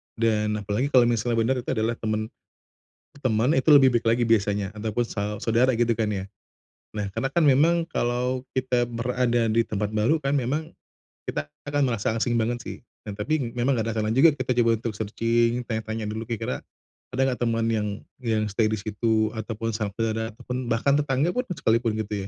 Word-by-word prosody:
Dan, 105 Hz, -2 st, +1 dB
apalagi 105 Hz, +6 st, -1 dB
kalau 130 Hz, -3 st, +5 dB
misalnya 120 Hz, 0 st, +1 dB
benar 115 Hz, +4 st, +2 dB
itu 120 Hz, -, -9 dB
adalah 115 Hz, +1 st, 0 dB
teman 110 Hz, 0 st, -2 dB, 0.9 s
teman, 120 Hz, +5 st, +2 dB
itu 135 Hz, -, 0 dB
lebih 140 Hz, -2 st, +8 dB
baik 115 Hz, -, -1 dB
lagi 115 Hz, +1 st, +2 dB
biasanya, 105 Hz, -3 st, +2 dB
ataupun 110 Hz, +2 st, -1 dB
sau 105 Hz, 0 st, -3 dB
saudara 120 Hz, +3 st, +3 dB
gitu 115 Hz, -1 st, +1 dB
kan 110 Hz, -2 st, 0 dB
ya. 95 Hz, -1 st, -4 dB, 0.7 s
Nah, 105 Hz, -, -1 dB
karena 135 Hz, -, -1 dB
kan 170 Hz, +3 st, +1 dB
memang, 165 Hz, +5 st, +4 dB
kalau 125 Hz, +1 st, 0 dB, 0.2 s
kita 125 Hz, -2 st, +1 dB
berada 120 Hz, 0 st, 0 dB
di 115 Hz, +1 st, +3 dB
tempat 105 Hz, -1 st, -3 dB
baru 115 Hz, +10 st, +2 dB
kan 140 Hz, -2 st, -2 dB
memang, 145 Hz, +5 st, -1 dB, 0.5 s
kita 75 Hz, 0 st, -4 dB, 0.2 s
akan 145 Hz, 0 st, 0 dB
merasa 110 Hz, -2 st, -1 dB
asing 115 Hz, +1 st, 0 dB
banget 120 Hz, +2 st, -1 dB
sih. -, -, -7 dB, 0.3 s
Nah 100 Hz, -, -6 dB
tapi, 155 Hz, +8 st, 0 dB, 0.2 s
memang 130 Hz, +3 st, +2 dB
ada 115 Hz, -, -2 dB
kalanya 110 Hz, 0 st, 0 dB
juga 145 Hz, +4 st, +5 dB
kita 130 Hz, 0 st, 0 dB
coba 115 Hz, -1 st, +3 dB
untuk 115 Hz, -1 st, -4 dB
searching, 115 Hz, +3 st, 0 dB
tanya-tanya 110 Hz, -1 st, -3 dB
dulu 110 Hz, +2 st, -5 dB
kira-kira, 115 Hz, -, -3 dB, 0.5 s
ada 130 Hz, -, 0 dB
enggak 125 Hz, -, -4 dB
teman 115 Hz, 0 st, 0 dB
yang 105 Hz, -2 st, 0 dB, 0.3 s
yang 110 Hz, -3 st, 0 dB
stay 110 Hz, +2 st, +2 dB
di 110 Hz, -, 0 dB
situ, 110 Hz, +1 st, 0 dB
atau 110 Hz, -1 st, -5 dB
pun 115 Hz, +1 st, -2 dB
sampe 105 Hz, -2 st, -3 dB
ada 110 Hz, 0 st, -2 dB
teman, 125 Hz, +1 st, -5 dB
bahkan 130 Hz, +5 st, +2 dB
tetangga 145 Hz, +3 st, +1 dB
pun 250 Hz, +4 st, -2 dB
sekalipun 115 Hz, -, +1 dB
gitu 105 Hz, -2 st, -3 dB
115 Hz, 185 wpm, -25 LUFS, 110-125 Hz, 0.9 s, lebih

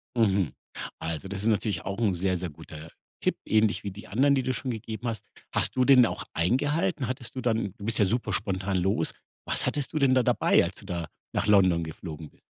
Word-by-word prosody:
Mhm, 100 Hz, -, +2 dB, 0.5 s
also 80 Hz, +2 st, -4 dB
das 95 Hz, 0 st, -4 dB
ist 105 Hz, -, -1 dB
natürlich 105 Hz, -5 st, 0 dB
auch 100 Hz, 0 st, -3 dB
'n 110 Hz, -4 st, +2 dB
sehr, 95 Hz, +1 st, 0 dB
sehr 90 Hz, 0 st, -4 dB
guter 80 Hz, +2 st, -11 dB, 0.3 s
Tipp, -, -, +1 dB
ähnlich 110 Hz, -1 st, +2 dB
wie 100 Hz, -, -4 dB
die 100 Hz, +3 st, -11 dB
anderen, 140 Hz, +6 st, +3 dB
die 130 Hz, -, +1 dB
du 130 Hz, -, 0 dB
schon 130 Hz, +2 st, -4 dB
gegeben 110 Hz, +1 st, -5 dB
hast. 115 Hz, -4 st, -3 dB, 0.3 s
Hast -, -, +2 dB
du 130 Hz, -1 st, +3 dB
den 130 Hz, -3 st, +7 dB
auch -, -, -3 dB
eingehalten? 145 Hz, -, +1 dB
Hattest 125 Hz, 0 st, -5 dB
du 130 Hz, -, -3 dB
dann 110 Hz, -5 st, 0 dB
du 100 Hz, -, -8 dB
bist 115 Hz, -1 st, +1 dB
ja 105 Hz, -, +5 dB
super 120 Hz, +6 st, -1 dB
spontan 95 Hz, -2 st, -1 dB
los. 95 Hz, +2 st, +1 dB, 0.3 s
Was -, -, 0 dB
hattest 145 Hz, -2 st, -1 dB
du 155 Hz, -, 0 dB
denn 135 Hz, -2 st, +4 dB
da 130 Hz, -, +4 dB
dabei, -, -, +4 dB
als -, -, -4 dB
du -, -, -9 dB
da 85 Hz, -2 st, -4 dB, 0.3 s
nach 100 Hz, -, 0 dB
London 95 Hz, -5 st, +5 dB
geflogen 80 Hz, -1 st, -7 dB
bist? -, -, -30 dB
105 Hz, 225 wpm, -27 LUFS, 95-125 Hz, 0.5 s, den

